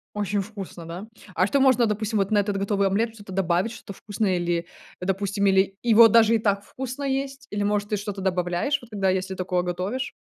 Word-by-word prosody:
Очень 205 0 -1
вкусно, 190 -5 -9
да? 180 +6 -7 0.3
А 185 - +3
что 275 +6 +1
можно, 255 -3 +4
допустим, 215 0 -1
вот 195 +1 0
на 205 - +4
этот 205 0 0
готовый 200 0 +1
омлет 225 +4 0
что-то 205 -3 -11
добавить, 185 +3 +1
что-то 230 -3 -9
вкусное 205 -2 -2
или, 170 -1 -1 0.3
э, - - -4
допустим, 200 +1 0
или 195 0 +3
его 230 0 +8
даже 230 +1 +5
и - - +4
так 200 -2 0
вкусно 265 +3 -6
есть, 275 0 -3
или, 205 0 -2
может, 205 0 0
ты 210 - +1
что-то 205 -1 -5
добавляешь, 180 +8 0
вот 235 - -15
когда, 195 -2 0
если 190 0 -2
такое 180 -1 -1
готовишь? 185 +9 -3
205 Hz, 210 wpm, -24 LUFS, 190-225 Hz, 0.3 s, его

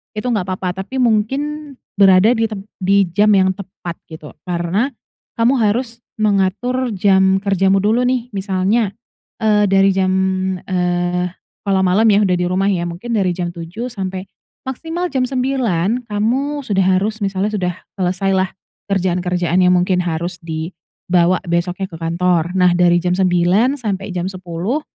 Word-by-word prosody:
itu 210 - -4
enggak 200 -5 -1
apa-apa. 185 0 -3
Tapi 260 - -10
mungkin 270 +5 0 0.2
berada 195 +2 +6
di 225 -2 +1
tem 210 -3 -7 0.2
di 195 +1 +3
jam 205 +4 +3
yang 190 -1 +4
tepat, 185 -3 -8
gitu. 155 -2 -10 0.2
Karena, 175 +7 0 0.5
kamu 230 +3 +3
harus 230 +2 0 0.2
mengatur 215 +4 0
jam 190 0 +3
kerjamu 195 -1 +2
dulu 230 +4 +2
nih, 250 -1 -1
misalnya, 195 +2 0 0.5
eee, 210 -1 +4
dari 195 0 +4
jam, 185 0 +1 0.5
eee, 180 -1 0 0.4
kalau 195 -1 +2
malam 190 +5 +3
ya 210 -1 +4
udah 180 -2 +2
di 180 - 0
rumah 195 +2 +1
ya, 175 -2 -1
mungkin 180 +8 -6
dari 190 -5 +1
jam 175 -1 -3
7 175 +9 -6
sampai 190 -3 -4 0.4
maksimal 325 +7 -4
jam 260 -2 +1
9 250 -4 -1
kamu 260 +8 -1
sudah 195 -4 +1 0.2
harus 215 +3 -2
misalnya 200 +1 -1
sudah 180 -4 -1 0.3
selesai 185 +2 0
lah 190 0 +1 0.4
kerjaan-kerjaan 180 -1 0
yang 180 0 +4
mungkin 180 0 +1
harus 170 +1 -3
dibawa 170 +2 -1
besoknya 175 +2 -1
ke 185 - -14
kantor. 170 0 +1
Nah, 180 -1 +4
dari 175 0 +4
jam 180 +1 0
9 185 +8 +2
sampai 200 -5 -3
jam 180 -1 -3
10 185 - -3
190 Hz, 150 wpm, -18 LUFS, 180-220 Hz, 0.5 s, berada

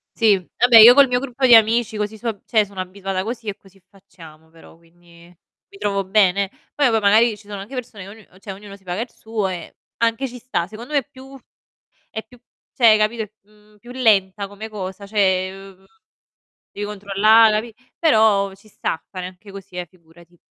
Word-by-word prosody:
Sì, 220 -3 +4 0.2
vabbè, 245 -2 +6
io 230 +3 +11
col 280 0 +6
mio 245 0 0
gruppo 260 0 -2
di 245 - +8
amici 225 0 +3
così 210 +1 -4
su 235 +2 -3 0.2
cioè 215 -3 +2
sono 195 -2 -7
abituata 190 0 -5
così 225 +1 -6
e 205 - -3
così 195 0 -23
facciamo, 165 -5 -17
però, 165 0 -18
quindi 170 +1 -27 0.6
mi 400 - -16
trovo 200 - -1
bene. 195 0 +2 0.2
Poi, 285 -3 +3
boh, 225 -1 +2
magari 215 +2 +3
ci 205 - -19
sono 205 -1 -7
anche 210 +7 -11
persone 215 -6 -8
ognu 215 +2 -13 0.2
cioè 200 0 -9
ognuno 200 +1 -11
si 195 - -21
paga 180 +4 -4
il 245 - -5
suo 220 -3 -4
e 180 -2 -7 0.2
anche 230 +3 0
ci 250 0 -10
sta. 240 -8 -3
Secondo 235 +7 -10
me 285 - +4
è 270 - -11
più 270 0 -13 0.7
è 220 - -6
più 245 - -19 0.4
cioè 240 - +3
hai 215 - +6
capito, 220 +1 0 0.2
mhmm, 210 0 -26
più 240 +4 -15
lenta 205 -5 +1
come 205 +2 -9
cosa, 200 -1 -7
cioè, 190 -3 +1 0.3
uhm, 190 - -26 0.9
devi 205 0 -5
controllare, 210 +2 +4
capi 220 +1 -3 0.2
però 215 - +3
ci 200 +2 -22
sta 165 - -4
fare 185 -2 -6
anche 185 +2 -13
così, 195 -1 -12
eh, 180 -1 -4
figurati. 170 -1 -22
210 Hz, 195 wpm, -20 LUFS, 190-230 Hz, 0.9 s, io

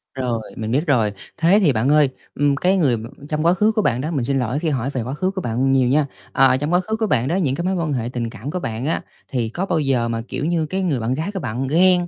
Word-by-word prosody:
Rồi, 125 -4 -1 0.2
mình 110 0 -3
biết 150 +6 +1
rồi. 115 -7 +3 0.3
Thế 175 +6 +4
thì 145 -6 +4
bạn 115 +5 +1
ơi, 150 -2 +5 0.3
ừm, 145 0 +2
cái 185 +6 +2
người 135 -9 +2
m 110 - -7 0.2
trong 155 +1 -1
quá 170 - +5
khứ 210 +4 +3
của 215 -1 +1
bạn 120 -6 +1
đó, 155 - -3
mình 140 -7 -1
xin 135 +1 +1
lỗi 125 +4 -1
khi 165 -1 -1
hỏi 135 -2 -1
về 130 -4 -3
quá 130 +3 -4
khứ 185 +5 -1
của 190 -1 -4
bạn 125 +2 0
nhiều 130 -2 +3
nha. 145 +1 +3 0.3
À, 130 -1 +4
trong 145 +5 -2
quá 180 - +5
khứ 220 +4 -2
của 220 -1 -1
bạn 125 - +1
đó, 170 - 0
những 145 -8 +1
cái 170 - -3
mối 190 - +1
quan 165 -4 -1
hệ 120 -2 -2
tình 115 -2 -2
cảm 120 +5 -7
của 180 - -2
bạn 115 -2 -4
á 165 - 0 0.3
thì 120 -4 -1
có 180 +11 -3
bao 170 -4 0
giờ 135 -5 +1
mà, 115 -1 -2
kiểu 145 - -3
như, 165 -1 +1
cái 190 +5 -2
người 150 -9 0
bạn 115 +3 -1
gái 160 +8 -2
của 190 - -3
bạn 130 -2 -3
ghen, 175 +3 +4
140 Hz, 305 wpm, -21 LUFS, 125-175 Hz, 0.3 s, ơi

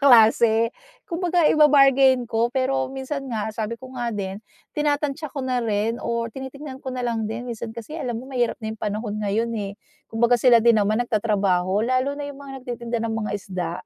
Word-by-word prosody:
klase. 230 -3 +5 0.3
Kumbaga, 350 -2 0
iba-bargain 275 -4 +5
ko, 230 +1 0
pero 265 +1 0
minsan 270 +2 -4
nga, 220 -2 -3
sabi 220 +1 -3
ko 260 +1 -12
nga 240 -2 -3
din, 200 -2 -4 0.3
tinatantiya 295 0 -1
ko 270 -1 -5
na 250 -1 0
rin 225 +1 -1
o 235 0 -1
tinitingnan 265 +1 -8
ko - - -7
na 255 -1 -3
lang 225 -3 -1
din. 230 +2 -5
Minsan 235 -1 -5
kasi 305 +8 -7
alam 240 -2 -2
mo, 240 - -6
mahirap 245 -2 0
na 220 - -2
'yong 220 - -12
panahon 210 +1 -3
ngayon, 215 +3 0
eh. 200 0 -5 0.3
Kumbaga, 235 +1 +2
sila 245 -2 +7
din 230 -2 +5
naman 215 +4 +1
nagtatrabaho, 200 -3 +1
lalo 255 +3 0
na 290 - -4
'yong 285 -1 -8
mga 275 -1 -9
nagtitinda 240 -1 -4
ng 225 - -1
mga 220 -1 -2
isda 180 -4 -4
235 Hz, 190 wpm, -23 LUFS, 220-265 Hz, 0.3 s, sila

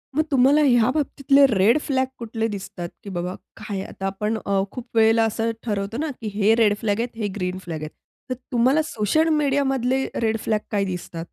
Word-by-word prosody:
मग 310 - +3
तुम्हाला 275 +3 +5
ह्या 240 -3 +4
बाबतीतले 280 -1 +3
रेड 215 +3 +4
फ्लॅग 265 -2 +1
कुठले 225 -1 -2
दिसतात? 190 -4 -6
की 200 - -8
बाबा 180 0 -3 0.2
काय 205 -3 -5
आता 195 - -7
आपण 210 +3 -2
अ, 200 -1 +1
खूप 250 -1 -8
वेळेला 225 0 +5
असं 225 +1 -1
ठरवतो 205 0 -2
ना 305 0 -2
की 220 - -4
हे 210 +1 +3
रेड 215 -3 +4
फ्लॅग 210 -1 0
आहेत, 235 0 -3
हे 215 -2 -2
ग्रीन 180 -1 -2
फ्लॅग 165 -3 -5
आहेत. 155 - -5 0.4
तर 255 - -1 0.2
तुम्हाला 255 +6 +3
सोशल 310 +10 +1
मीडियामधले 270 -3 +1
रेड 225 -1 0
फ्लॅग 215 -1 +1
काय 200 -1 +1
दिसतात? 175 -2 -5
225 Hz, 190 wpm, -23 LUFS, 200-260 Hz, 0.4 s, तुम्हाला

